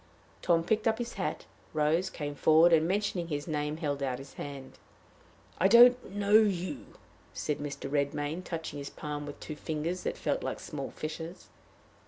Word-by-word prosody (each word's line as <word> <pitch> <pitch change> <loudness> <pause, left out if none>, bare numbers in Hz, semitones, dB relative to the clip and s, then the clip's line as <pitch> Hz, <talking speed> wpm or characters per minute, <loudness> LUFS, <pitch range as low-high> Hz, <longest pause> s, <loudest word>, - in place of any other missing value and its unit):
Tom 165 -2 +3
picked 220 +5 +1
up 220 0 +2
his 240 0 -4
hat, - - -3 0.3
rose, 155 +4 +2
came 145 -2 -5
forward, 160 +4 +5
and, 160 0 +4
mentioning 195 -2 -1
his 145 -1 -3
name, 150 -1 -2
held 145 -4 -2
out 130 -2 -1
his 135 +1 -11
hand. 140 -2 -8 0.8
"I 190 - +5
don't 245 0 +6
know 205 +1 +5
you," 200 +3 -1 0.4
said 150 - -2
Mr. 145 -1 -5
Redmain, 145 +4 -1
touching 160 -4 -5
his 140 - -6
palm 145 -1 -5
with 145 - -8
two 155 - -6
fingers 160 +4 -3
that - - -3
felt - - -1
like - - -3
small - - -5
fishes. 160 +3 -7
160 Hz, 170 wpm, -30 LUFS, 145-185 Hz, 0.8 s, don't